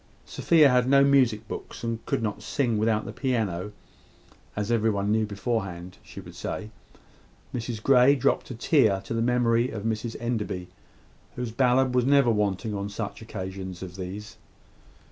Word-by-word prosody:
Sophia 160 Hz, -3 st, +4 dB
had 125 Hz, 0 st, +3 dB
no 140 Hz, 0 st, +6 dB
music 125 Hz, -6 st, +3 dB
books, -, -, -8 dB
and 115 Hz, -1 st, -3 dB
could 115 Hz, -, -1 dB
not 105 Hz, -1 st, -3 dB
sing 120 Hz, -1 st, 0 dB
without 110 Hz, 0 st, +1 dB
the -, -, -7 dB
piano, 105 Hz, -7 st, -2 dB, 0.8 s
as 105 Hz, +2 st, -2 dB
every 115 Hz, -1 st, +2 dB
one 100 Hz, -1 st, 0 dB
knew 110 Hz, 0 st, +1 dB
beforehand 100 Hz, -4 st, -4 dB
she -, -, -11 dB
would -, -, -11 dB
say. 110 Hz, 0 st, -5 dB, 0.8 s
Mrs 115 Hz, -2 st, -4 dB
Grey 135 Hz, +1 st, +6 dB
dropped 130 Hz, -, 0 dB
a 125 Hz, -, -6 dB
tear 115 Hz, -, +3 dB
to -, -, -6 dB
the 115 Hz, -, 0 dB
memory 120 Hz, 0 st, +2 dB
of 105 Hz, -5 st, -6 dB
Mrs 115 Hz, +1 st, -2 dB
Enderby, 105 Hz, -7 st, -3 dB, 0.7 s
whose 125 Hz, -2 st, -4 dB
ballad 130 Hz, +1 st, +2 dB
was 125 Hz, -1 st, +3 dB
never 140 Hz, -4 st, +5 dB
wanting 105 Hz, 0 st, -1 dB
on 100 Hz, 0 st, -3 dB
such 100 Hz, -, -5 dB
occasions 95 Hz, -1 st, -6 dB
as 90 Hz, -1 st, -8 dB
these. 95 Hz, +3 st, -7 dB
115 Hz, 165 wpm, -26 LUFS, 100-125 Hz, 0.8 s, no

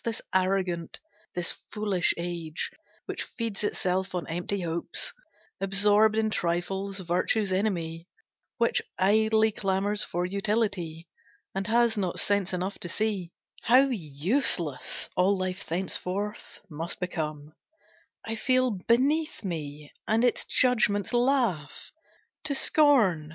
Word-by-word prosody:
This 230 Hz, -1 st, -2 dB
arrogant, 185 Hz, -3 st, 0 dB, 0.4 s
this 175 Hz, -1 st, 0 dB, 0.2 s
foolish 205 Hz, -5 st, +1 dB
age, 170 Hz, -2 st, -4 dB, 0.3 s
Which -, -, -4 dB
feeds 225 Hz, -3 st, -4 dB
itself 185 Hz, -2 st, -1 dB
on 175 Hz, -, -2 dB
empty 175 Hz, +4 st, -2 dB
hopes, 170 Hz, 0 st, -3 dB, 0.5 s
Absorbed 205 Hz, +2 st, +4 dB
in 220 Hz, -1 st, +1 dB
trifles, 190 Hz, +3 st, -1 dB
virtue's 185 Hz, +3 st, 0 dB
enemy, 170 Hz, -4 st, -1 dB, 0.5 s
Which 235 Hz, -1 st, +2 dB, 0.2 s
idly 220 Hz, +3 st, +4 dB
clamors 200 Hz, +1 st, 0 dB
for 175 Hz, +1 st, -2 dB
utility, 190 Hz, -4 st, -1 dB, 0.5 s
And 195 Hz, +1 st, -2 dB
has 230 Hz, -1 st, +3 dB
not 185 Hz, -3 st, -1 dB
sense 200 Hz, -2 st, +1 dB
enough 185 Hz, +2 st, -3 dB
to 175 Hz, -, -5 dB
see 200 Hz, -3 st, -1 dB, 0.3 s
How 260 Hz, +4 st, +5 dB
useless 170 Hz, -, -1 dB
all 190 Hz, +2 st, +3 dB
life 185 Hz, 0 st, -3 dB
thenceforth 190 Hz, +4 st, -3 dB
must 165 Hz, 0 st, -5 dB
become, 155 Hz, -4 st, -4 dB, 0.7 s
I 225 Hz, 0 st, -2 dB
feel 255 Hz, +1 st, +3 dB
beneath 260 Hz, -, +1 dB
me, 150 Hz, -4 st, -5 dB
and 225 Hz, +2 st, +2 dB
its 245 Hz, -, +2 dB
judgments 220 Hz, -4 st, +2 dB
laugh 240 Hz, -, +1 dB, 0.5 s
To 285 Hz, -2 st, +1 dB
scorn. 230 Hz, -, +4 dB
195 Hz, 115 wpm, -28 LUFS, 175-220 Hz, 0.7 s, How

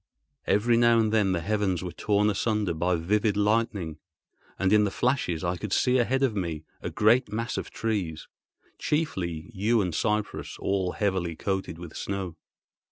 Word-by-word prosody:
Every 115 Hz, +4 st, +3 dB
now 120 Hz, 0 st, +5 dB
and 110 Hz, -1 st, +2 dB
then 105 Hz, -4 st, +3 dB
the 85 Hz, -2 st, 0 dB
heavens 95 Hz, -2 st, 0 dB
were 90 Hz, -, -4 dB
torn 105 Hz, +4 st, +1 dB
asunder 105 Hz, -2 st, 0 dB
by 90 Hz, +3 st, +1 dB
vivid 105 Hz, +5 st, +1 dB
lightning, 105 Hz, -6 st, 0 dB, 0.6 s
and 95 Hz, +1 st, +2 dB
in 105 Hz, 0 st, +6 dB
the 105 Hz, -, +1 dB
flashes 95 Hz, -, 0 dB
I 90 Hz, 0 st, -1 dB
could 105 Hz, +2 st, -6 dB
see 125 Hz, +5 st, +3 dB
ahead 130 Hz, +3 st, +1 dB
of 125 Hz, -5 st, +2 dB
me 85 Hz, -5 st, -3 dB, 0.2 s
a -, -, -3 dB
great 115 Hz, +4 st, +3 dB
mass 115 Hz, +2 st, -2 dB
of -, -, -4 dB
trees, 95 Hz, -9 st, -3 dB, 0.5 s
chiefly 95 Hz, -, -2 dB
yew 110 Hz, +4 st, +2 dB
and 90 Hz, -5 st, 0 dB
cypress 105 Hz, +4 st, -1 dB
all 95 Hz, -2 st, -1 dB
heavily 95 Hz, -5 st, -1 dB
coated 95 Hz, -2 st, -3 dB
with 85 Hz, -2 st, -9 dB
snow. 95 Hz, -4 st, -4 dB
100 Hz, 165 wpm, -27 LUFS, 90-110 Hz, 0.6 s, in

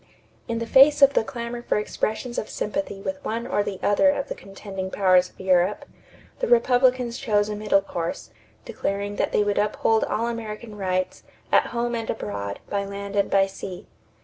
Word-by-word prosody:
In 230 Hz, -, -2 dB
the 230 Hz, -, -2 dB
face 280 Hz, +4 st, +6 dB
of 275 Hz, 0 st, +7 dB
the -, -, +3 dB
clamor 235 Hz, 0 st, -5 dB
for 240 Hz, -, 0 dB
expressions 220 Hz, +3 st, -2 dB
of 215 Hz, -, -6 dB
sympathy 210 Hz, -3 st, -3 dB
with 285 Hz, +7 st, -5 dB
one 230 Hz, +2 st, -3 dB
or -, -, 0 dB
the 200 Hz, -2 st, -4 dB
other 205 Hz, +8 st, +4 dB
of 285 Hz, -1 st, -1 dB
the -, -, -2 dB
contending 195 Hz, -1 st, -7 dB
powers 185 Hz, -2 st, +3 dB
of -, -, -28 dB
Europe, 185 Hz, +1 st, +2 dB, 0.5 s
the -, -, 0 dB
Republicans 255 Hz, -, +3 dB
chose 210 Hz, -1 st, +1 dB
a 210 Hz, -, -3 dB
middle 210 Hz, -1 st, +2 dB
course, 170 Hz, -3 st, -4 dB, 0.3 s
declaring 200 Hz, +1 st, -3 dB
that -, -, 0 dB
they 210 Hz, -, +3 dB
would 205 Hz, 0 st, 0 dB
uphold 215 Hz, +1 st, +2 dB
all 230 Hz, -, -1 dB
American 225 Hz, -1 st, -5 dB
rights 185 Hz, -2 st, -2 dB, 0.3 s
"at -, -, +4 dB
home 240 Hz, 0 st, -2 dB
and 230 Hz, -1 st, -3 dB
abroad, 100 Hz, -1 st, -4 dB
by 200 Hz, -1 st, -1 dB
land 200 Hz, 0 st, -6 dB
and 200 Hz, -1 st, +2 dB
by 195 Hz, 0 st, +4 dB
sea." 195 Hz, -1 st, -8 dB
210 Hz, 185 wpm, -24 LUFS, 195-235 Hz, 0.5 s, of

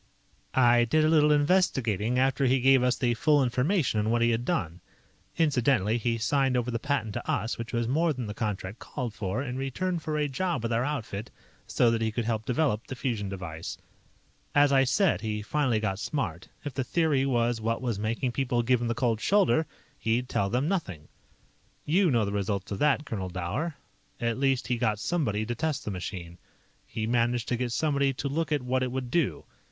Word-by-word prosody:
"I 120 Hz, -2 st, +5 dB
did 155 Hz, +6 st, +2 dB
a -, -, +3 dB
little 150 Hz, -2 st, +5 dB
investigating 130 Hz, -, +2 dB
after 135 Hz, +1 st, +2 dB
he 130 Hz, +1 st, +3 dB
gave 135 Hz, +1 st, +5 dB
us 125 Hz, 0 st, +2 dB
the 120 Hz, -2 st, +1 dB
full 145 Hz, +5 st, +3 dB
information 125 Hz, -, +1 dB
on 105 Hz, +1 st, 0 dB
what 115 Hz, +1 st, +2 dB
he 120 Hz, -, +3 dB
had 115 Hz, +1 st, -1 dB
done. 85 Hz, -4 st, -2 dB, 0.6 s
(Incidentally, 125 Hz, -, +2 dB
he 115 Hz, 0 st, 0 dB
signed 135 Hz, +2 st, +1 dB
over 125 Hz, 0 st, -1 dB
the 115 Hz, -, -2 dB
patent 120 Hz, -6 st, -1 dB
to -, -, -5 dB
us, 115 Hz, +2 st, -1 dB
which 115 Hz, 0 st, -5 dB
was 120 Hz, -1 st, -1 dB
more 160 Hz, +6 st, +2 dB
than 130 Hz, -5 st, -4 dB
the 105 Hz, -, -5 dB
contract 105 Hz, -1 st, -4 dB
called 125 Hz, -6 st, -5 dB
for, 110 Hz, +2 st, -3 dB
in 125 Hz, -2 st, -4 dB
return 170 Hz, +7 st, -2 dB
for 155 Hz, -1 st, -3 dB
a 150 Hz, -1 st, +1 dB
job 145 Hz, -1 st, -2 dB
with 115 Hz, 0 st, -1 dB
our 115 Hz, +2 st, +1 dB
outfit, 120 Hz, -6 st, -4 dB, 0.4 s
so 120 Hz, -2 st, +3 dB
that 115 Hz, -1 st, 0 dB
he 110 Hz, -1 st, 0 dB
could 115 Hz, +1 st, -2 dB
help 110 Hz, -1 st, -1 dB
develop 125 Hz, -4 st, 0 dB
the 130 Hz, -, -5 dB
fusion 115 Hz, -7 st, -2 dB
device.) 85 Hz, -4 st, -6 dB, 0.8 s
"As 145 Hz, -1 st, +5 dB
I 135 Hz, -1 st, +5 dB
said, 190 Hz, +7 st, +2 dB
he 105 Hz, -1 st, -3 dB
finally 130 Hz, -2 st, +1 dB
got 100 Hz, -3 st, -2 dB
smart. 95 Hz, -, -3 dB, 0.2 s
If 145 Hz, -, -4 dB
the 130 Hz, -, -1 dB
theory 150 Hz, -1 st, +1 dB
was 120 Hz, -3 st, +1 dB
what 115 Hz, +1 st, -1 dB
was 120 Hz, -6 st, -2 dB
making 115 Hz, +4 st, -1 dB
people 125 Hz, -2 st, 0 dB
give 125 Hz, 0 st, +2 dB
him 120 Hz, -, -1 dB
the 115 Hz, -, -1 dB
cold 115 Hz, -4 st, 0 dB
shoulder, 190 Hz, -6 st, +3 dB, 0.3 s
he'd 120 Hz, +3 st, 0 dB
tell 100 Hz, -5 st, 0 dB
them 125 Hz, +7 st, 0 dB
nothing. 95 Hz, -, -3 dB, 0.8 s
"You 180 Hz, +4 st, +3 dB
know 115 Hz, -6 st, +2 dB
the 100 Hz, -, -3 dB
results 100 Hz, -1 st, -2 dB
of 100 Hz, -, -3 dB
that, 150 Hz, 0 st, +2 dB
Colonel 95 Hz, -8 st, -4 dB
Dower. 95 Hz, -, -3 dB, 0.4 s
At 115 Hz, +1 st, -1 dB
least 135 Hz, -2 st, +1 dB
he 125 Hz, -, -1 dB
got 110 Hz, -3 st, +1 dB
somebody 110 Hz, -, -1 dB
to 120 Hz, -, -2 dB
test 150 Hz, +3 st, -2 dB
the 105 Hz, -, -2 dB
machine. 90 Hz, -2 st, -6 dB, 0.5 s
He 110 Hz, -, -3 dB
managed 120 Hz, +1 st, +1 dB
to 125 Hz, -, +1 dB
get 120 Hz, 0 st, -2 dB
somebody 140 Hz, -1 st, +1 dB
to 140 Hz, -, -4 dB
look 155 Hz, +3 st, -2 dB
at 145 Hz, -4 st, +1 dB
what 130 Hz, +1 st, 0 dB
it 130 Hz, -1 st, -1 dB
would 130 Hz, -1 st, -4 dB
do. 165 Hz, -4 st, 0 dB
125 Hz, 210 wpm, -28 LUFS, 110-140 Hz, 0.8 s, I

